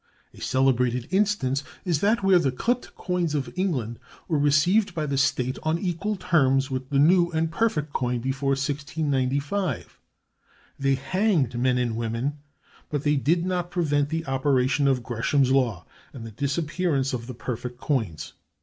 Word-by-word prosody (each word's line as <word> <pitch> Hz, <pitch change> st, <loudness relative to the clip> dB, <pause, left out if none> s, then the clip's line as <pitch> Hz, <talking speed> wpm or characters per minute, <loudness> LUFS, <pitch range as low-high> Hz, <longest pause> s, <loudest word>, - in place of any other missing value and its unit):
A -, -, -14 dB
celebrated 125 Hz, -2 st, +1 dB
instance 190 Hz, -9 st, +1 dB, 0.2 s
is 170 Hz, -5 st, +1 dB
that 210 Hz, +1 st, +2 dB
where 190 Hz, -2 st, +5 dB
the 140 Hz, -6 st, +1 dB
clipped 240 Hz, -, -2 dB
coins 175 Hz, -4 st, -1 dB
of 130 Hz, -4 st, -3 dB
England 130 Hz, -, -2 dB, 0.3 s
were 155 Hz, -3 st, +1 dB
received 170 Hz, +8 st, +3 dB
by 155 Hz, -2 st, -1 dB
the 140 Hz, -1 st, -2 dB
state 130 Hz, -2 st, 0 dB
on 155 Hz, +1 st, 0 dB
equal 185 Hz, +4 st, -2 dB
terms 140 Hz, -7 st, +2 dB
with 130 Hz, +1 st, -4 dB
new 170 Hz, +5 st, +4 dB
and 160 Hz, 0 st, 0 dB
perfect 160 Hz, -7 st, 0 dB
coin 125 Hz, -1 st, 0 dB
before 135 Hz, +2 st, 0 dB
1695. 140 Hz, -, -2 dB, 0.8 s
They 135 Hz, -1 st, +2 dB
hanged 150 Hz, -, 0 dB
men 125 Hz, +1 st, +2 dB
and 120 Hz, -2 st, 0 dB
women, 115 Hz, +6 st, -2 dB, 0.5 s
but 145 Hz, -2 st, -2 dB
they 150 Hz, 0 st, +2 dB
did 165 Hz, +5 st, +1 dB
not 180 Hz, -1 st, -1 dB
prevent 145 Hz, -5 st, 0 dB
the 160 Hz, +1 st, -2 dB
operation 135 Hz, 0 st, +1 dB
of 130 Hz, -3 st, +1 dB
Gresham's 130 Hz, +3 st, +1 dB
law 120 Hz, -10 st, +1 dB, 0.3 s
and 120 Hz, -4 st, -8 dB
the 115 Hz, -, -8 dB
disappearance 140 Hz, -, -1 dB
of 120 Hz, -1 st, -4 dB
the 125 Hz, -, -7 dB
perfect 125 Hz, +1 st, -5 dB
coins. 100 Hz, -, -2 dB
140 Hz, 155 wpm, -25 LUFS, 130-170 Hz, 0.8 s, where